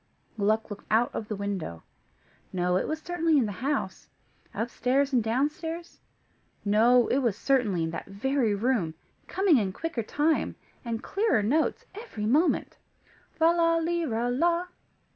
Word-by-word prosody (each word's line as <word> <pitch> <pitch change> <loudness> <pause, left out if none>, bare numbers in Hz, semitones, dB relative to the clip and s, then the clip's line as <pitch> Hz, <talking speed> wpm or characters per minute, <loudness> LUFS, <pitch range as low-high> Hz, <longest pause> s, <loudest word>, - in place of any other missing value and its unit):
Gluck 215 +1 0
looked 205 - -8
out 225 +3 +2
of 215 - -4
the 215 - -3
window. 195 - -4 0.7
No, 180 -1 0
it 185 - 0
was 315 - -2
certainly 330 -3 +1
in 260 - +3
the 210 - -3
house. 280 +3 -2 0.4
Upstairs, 260 +4 0
and 240 -3 +3
downstairs. 300 +8 -2 0.7
No, 230 +4 +5
it 265 - +2
was 235 -7 0
certainly 230 -11 +1
in 160 - -2
that - - -6
very 225 +2 0
room, 200 -7 0 0.3
coming 380 -8 +3
in 195 -3 -1
quicker 330 - -3
time, 295 +8 0 0.3
and 230 -1 -4
clearer 400 - +1
notes, 295 +9 +1
every 405 - -6
moment. 295 +10 +2 0.6
"Lala 330 0 +4
lira 320 -9 -1
la." 340 +6 +1
250 Hz, 145 wpm, -27 LUFS, 210-320 Hz, 0.7 s, No